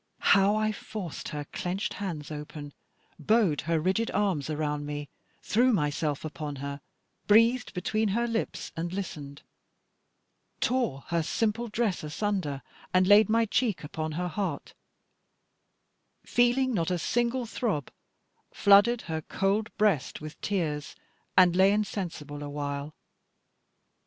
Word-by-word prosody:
How 200 +1 +4
I 215 0 +1
forced 195 -6 -6
her 150 -1 -5
clenched 185 +3 -2
hands 160 -7 -5
open, 150 -1 -7 0.5
bowed 190 -2 +2
her 165 -1 +3
rigid 190 +8 +1
arms 190 -8 0
around 150 -1 -2
me, 145 -1 -5 0.3
threw 245 +4 +3
myself 150 - 0
upon 150 -1 -5
her, 140 +1 -6 0.5
breathed 230 +3 +4
between 215 +5 0
her 230 +4 +1
lips 230 -1 -3
and 170 +1 -3
listened, 150 -7 -6 1.2
tore 245 - 0
her 170 -1 +1
simple 225 +7 -1
dress 215 -5 -1
asunder 150 -3 -2 0.3
and 185 0 +4
laid 205 +3 +6
my 230 +1 +3
cheek 220 -4 0
upon 155 +1 -4
her 180 +3 -2
heart; 175 -3 -3 1.5
feeling 245 +2 +2
not 170 -5 0
a 180 - +1
single 240 +7 0
throb, 210 - -2 0.6
flooded 205 +4 +5
her 160 -1 -3
cold 200 +6 0
breast 205 -10 +1
with 155 0 -9
tears, 155 -7 -2 0.4
and 180 -2 +6
lay 190 +2 +6
insensible 175 -8 -3
awhile. 145 0 -4
185 Hz, 125 wpm, -28 LUFS, 150-215 Hz, 1.5 s, laid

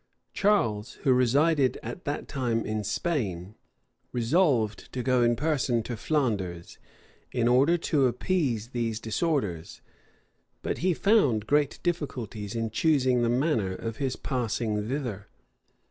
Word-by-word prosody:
Charles, 120 - +1
who 135 -3 +4
resided 135 +3 +3
at 180 - -7
that 145 -1 -3
time 120 -5 -1
in 110 0 -2
Spain, 100 - -2 0.6
resolved 120 - +1
to 125 - -3
go 130 -1 +2
in 120 0 +3
person 135 -4 0
to 120 - -4
Flanders, 105 - -2 0.5
in 120 -2 +1
order 135 +8 +4
to 150 -5 +2
appease 125 - -1
those 115 -3 -2
disorders; 110 - -2 0.8
but - - -2
he 180 0 +1
found 145 - +3
great 145 +2 +1
difficulties 120 - -3
in 115 -1 -2
choosing 130 -2 +2
the 120 - +2
manner 120 - +1
of 115 +2 -5
his 135 -2 -1
passing 115 -4 -2
thither. 120 -8 -4
125 Hz, 130 wpm, -27 LUFS, 110-145 Hz, 0.8 s, who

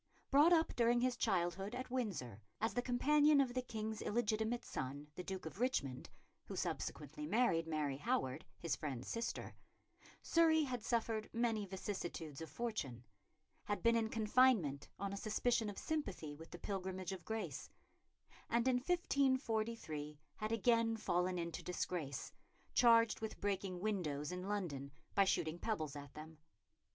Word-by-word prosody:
Brought 295 +5 +7
up 325 -2 +4
during 240 0 +4
his 250 0 +2
childhood 190 +1 0
at 255 0 -5
Windsor 180 - -2 0.2
as 225 - 0
the 245 - +1
companion 290 +4 +4
of 260 -3 +2
the 255 - 0
King's 220 -3 -4
illegitimate 220 +1 0
son, 140 +3 -4
the 180 - -5
Duke 190 -1 -5
of 160 +5 -7
Richmond 145 - 0 0.4
who - - -6
subsequently 150 0 -3
married 180 -5 +2
Mary 150 -4 -1
Howard, 130 0 -1
his 165 -3 -1
friend's 130 -5 -4
sister 235 +2 -3 0.7
Surrey 320 -1 +5
had 250 -4 -2
suffered 225 -2 0
many 225 -3 0
vicissitudes 175 -6 -5
of 160 - -6
fortune; 140 - -3 0.6
had 205 - -2
been 230 0 +5
in 225 -1 +2
confinement 215 - +3
on 200 0 -3
a - - -3
suspicion 220 +1 +1
of 205 - -7
sympathy 200 - -3
with 165 +2 -11
the - - -8
Pilgrimage 190 -1 -3
of 190 -2 -6
Grace; 220 0 -4 0.8
and 235 +2 +2
in 255 -1 +4
1543 230 - 0 0.2
had 215 +1 -2
again 230 0 +3
fallen 180 -2 +1
into 170 -2 -3
disgrace, 175 -5 -3 0.4
charged 230 -2 +6
with 220 - -4
breaking 195 -2 -1
windows 170 -8 -1
in 180 +1 -4
London 160 -10 -2 0.2
by 200 - +5
shooting 165 -2 0
pebbles 155 -11 -2
at 145 -1 -8
them. 155 0 -9
205 Hz, 150 wpm, -38 LUFS, 165-235 Hz, 0.8 s, Brought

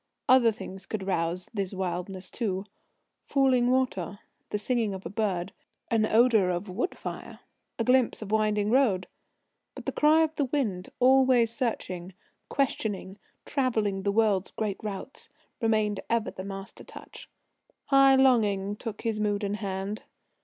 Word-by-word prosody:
Other 250 -3 +6
things 195 -2 -9
could 205 -3 -4
rouse 175 -1 -1
this 195 -2 -2
wildness 185 0 -4
too: 195 -4 -2 0.6
falling 260 -3 +3
water, 250 -8 0 0.3
the - - -1
singing 220 -1 -1
of 190 - -9
a 170 - -5
bird, 195 -4 -1 0.4
an 220 -1 +3
odour 220 -4 +4
of 180 +2 -3
wood 240 - -2
fire, - - -7 0.4
a 230 - 0
glimpse 250 -2 +2
of 205 - -8
winding 210 -1 +1
road. 230 -8 +3 0.7
But - - -9
the - - -1
cry 310 +2 +4
of 315 - 0 0.2
wind, 210 -11 -1
always 255 -2 +5
searching, 185 -8 -3 0.3
questioning, 210 -7 -2 0.3
travelling 220 -8 0
the 200 +1 0
world's 205 -3 +2
great 210 -3 -3
routes, 210 +4 -7 0.3
remained 215 -3 +1
ever 230 -1 0
the 185 - -7
master 195 -1 -8
touch. - - -12 0.6
High 275 -1 +6
longing 210 -7 +3
took 220 -2 -6
his 225 -2 -1
mood 205 0 0
in 200 0 -1
hand. 200 0 -4
210 Hz, 145 wpm, -28 LUFS, 195-245 Hz, 0.7 s, Other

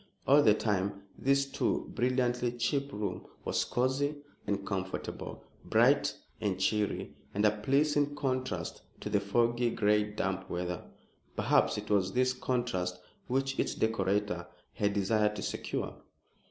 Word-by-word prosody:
All 145 +2 +7
the 110 -5 +5
same, 100 -1 0
this 140 +1 +2
too 140 - -1
brilliantly 125 -1 +1
cheap 135 +4 0
room 105 -5 -4 0.2
was - - +1
cosy 130 +4 0 0.3
and 100 -1 -1
comfortable, 95 -2 -4 0.2
bright 140 +6 +3 0.2
and 100 -3 -1
cheery, 105 +1 0 0.2
and 105 +2 +2
a 105 - +6
pleasing 145 +5 +2
contrast 130 - -2 0.2
to 105 - -4
the 105 - +4
foggy, 120 +4 +2
gray, 105 -1 +3
damp 95 -2 -2
weather. 90 0 -3 0.5
Perhaps - - +3
it 105 0 -5
was 95 -2 +2
this 130 0 +3
contrast 120 -9 -1 0.3
which 135 +1 0
its - - 0
decorator 105 -4 0 0.3
had 100 0 +1
desired 105 +1 +2
to - - -4
secure. - - -3
110 Hz, 135 wpm, -31 LUFS, 100-130 Hz, 0.5 s, All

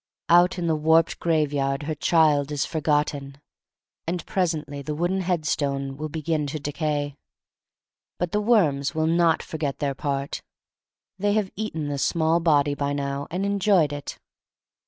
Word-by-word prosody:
Out 175 +2 +5
in 175 - -2
the 160 -1 +2
warped 160 +2 +3
graveyard 145 -4 0
her 155 +2 -2
child 150 -2 +3
is 145 -1 0
forgotten. 145 -3 -1 0.7
And 175 +1 -2
presently 155 -6 -2
the 150 +2 -4
wooden 175 +4 0
headstone 145 -6 -1
will 155 +2 -5
begin 155 -1 -2
to 150 +2 -4
decay. 145 -1 -2 1.0
But 175 -1 -2
the 210 - +1
worms 170 - +2
will 160 0 +1
not 165 0 +3
forgpt 150 -4 -4
their 140 -2 -1
part. 140 0 -3 0.8
They 205 +1 +1
have 210 -3 0
eaten 165 -8 -3
the 140 -1 -3
small 160 +3 +2
body 145 -4 +3
by 140 0 -2
now, 140 0 -3
and 180 +5 -2
enjoyed 200 -6 +2
it. 145 -1 -6
155 Hz, 150 wpm, -24 LUFS, 145-170 Hz, 1.0 s, Out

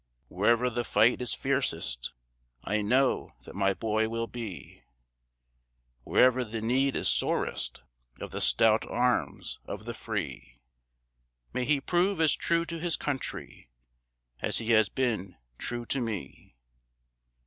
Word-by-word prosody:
Wherever 120 +6 +2
the 120 +1 -1
fight 115 +3 +3
is 125 - -1
fiercest 125 - -1 0.5
I 105 +2 0
know 125 +6 +1
that - - -11
my 100 -1 +1
boy 110 +1 0
will 115 0 -2
be; 115 -6 -8 1.2
Wherever 130 0 +4
the 115 -1 -5
need 130 +5 +1
is - - +1
sorest - - 0 0.4
Of - - -6
the - - -4
stout 110 -1 +4
arms 120 - 0
of - - -7
the - - -4
free. - - -5 1.0
May 125 0 0
he 145 0 +3
prove 175 +5 +1
as 160 -2 +4
true 170 0 +1
to 165 0 -5
his 170 0 0
country 135 - -5 0.7
As - - +1
he 115 0 -1
has 110 -2 +5
been 110 -7 -1 0.2
true 120 -1 -3
to 135 +3 0
me. 100 - -6
120 Hz, 135 wpm, -29 LUFS, 110-135 Hz, 1.2 s, has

